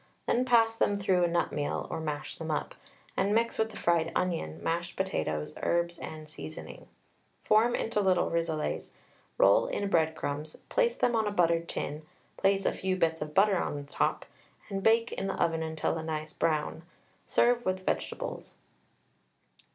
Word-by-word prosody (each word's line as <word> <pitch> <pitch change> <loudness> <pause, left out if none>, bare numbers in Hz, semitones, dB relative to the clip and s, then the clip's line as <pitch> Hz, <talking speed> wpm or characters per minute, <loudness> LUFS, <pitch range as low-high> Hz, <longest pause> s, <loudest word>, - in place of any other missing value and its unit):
Then 250 +2 +2
pass 230 -2 +4
them 205 -2 +2
through 190 -3 +2
a - - +4
nut 170 0 0
mill 145 - -2
or - - -2
mash 150 -2 -4
them 160 -1 -5
up, 150 - -2 0.4
and 200 +2 +2
mix 230 +1 +1
with 220 0 +2
the 215 - -10
fried 165 -1 +2
onion, 165 - -1
mashed 170 +1 -2
potatoes, 75 - -2
herbs, 170 0 0
and 155 -1 -7
seasoning; 80 - -9 0.6
form 225 +3 +4
into 210 -2 0
little 185 -2 +2
rissoles, 165 -2 -1 0.5
roll - - +5
in 200 - -2
breadcrumbs, 155 -2 0
place 485 -1 +2
them 240 - +2
on 220 -2 +2
a - - 0
buttered 170 -3 +2
tin, 150 +1 -3 0.3
place 195 0 +2
a - - +2
few 190 0 -1
bits 165 -3 +1
of 150 0 -5
butter 195 -1 +5
on - - -2
the 145 - -5
top, - - 0 0.4
and 195 -1 -2
bake 230 +2 +3
in 195 - -3
the 195 - -3
oven 165 -1 +1
until 160 0 -1
a - - -5
nice 155 -1 -4
brown. 155 0 0 0.5
Serve 240 0 +3
with 185 -1 -2
vegetables. - - -3
170 Hz, 170 wpm, -30 LUFS, 160-205 Hz, 0.6 s, roll